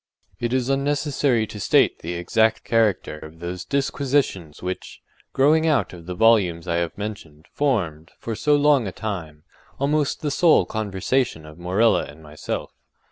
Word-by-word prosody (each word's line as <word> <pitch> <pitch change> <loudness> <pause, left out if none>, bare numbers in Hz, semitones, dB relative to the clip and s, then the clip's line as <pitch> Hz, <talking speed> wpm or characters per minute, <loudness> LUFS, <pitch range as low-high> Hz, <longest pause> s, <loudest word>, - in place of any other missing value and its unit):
It 120 0 -2
is 130 -1 0
unnecessary 140 -3 +1
to 105 - -9
state - - +3
the 85 +2 -5
exact 110 +6 +1
character 110 -9 +1
of 80 +1 -12
those 90 +1 -5
disquisitions 135 - -1
which, 90 0 -5 0.3
growing 155 +4 +3
out 150 -10 +1
of 85 -1 -12
the 90 - -4
volumes 95 -6 +3
I 85 -1 0
have 85 0 -2
mentioned, 95 -7 -7
formed, 90 - -1
for 115 - -5
so 150 +6 +2
long 145 -5 +3
a - - -4
time, 80 -8 -6 0.4
almost 145 +1 0
the 150 - 0
sole 155 - +4
conversation 105 -2 -1
of 75 +2 -13
Morella 95 +6 +2
and 75 +2 -13
myself. 75 0 -5
105 Hz, 155 wpm, -23 LUFS, 85-135 Hz, 0.4 s, sole